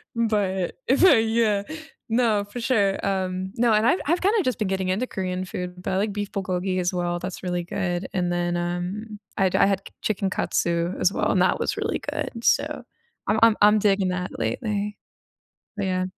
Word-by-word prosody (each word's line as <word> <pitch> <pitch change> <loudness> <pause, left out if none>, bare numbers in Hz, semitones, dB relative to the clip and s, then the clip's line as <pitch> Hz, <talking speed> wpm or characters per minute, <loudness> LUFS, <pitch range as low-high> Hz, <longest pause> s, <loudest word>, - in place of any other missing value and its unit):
but 205 -5 0
if 270 +9 +4
I 285 -10 +7
Yeah. 220 -2 +2 0.5
No, 225 -3 +2
for 205 +4 -7
sure, 205 -6 +1
um 190 -1 -2
No, 235 -1 +3
and 215 +2 +3
I've 345 - +3
I've 340 +3 +2
kinda 410 +2 +3
just 255 -4 -1
been 210 - 0
getting 190 -1 -1
into 210 +7 0
Korean 185 -1 -3
food, 180 0 -6
but - - -2
I - - +1
like 205 +1 0
beef 205 -1 -4
불고기 185 -1 -1
as 180 +1 0
well, 175 -1 -1
that's 185 +1 -6
really 175 -1 -1
good, 180 -1 -2
and 180 -2 0
then, 175 0 0
um, 180 +5 -4 0.2
I'd 190 -2 +2
I - - +5
had 195 -1 +1
c - - -16
chicken 195 -2 0
katsu 170 0 0
as 195 - +2
well, - - +1
and - - +2
that - - +2
was - - -1
really - - -1
good, 230 -1 -5
so, - - +1 0.4
I'm 215 - +2
I'm 225 -2 +6
I'm 210 +1 +7
digging 195 -2 +2
that 180 0 -4
lately. 210 -3 -2 0.8
But 195 - -1
yeah 185 0 0
195 Hz, 200 wpm, -24 LUFS, 180-215 Hz, 0.8 s, I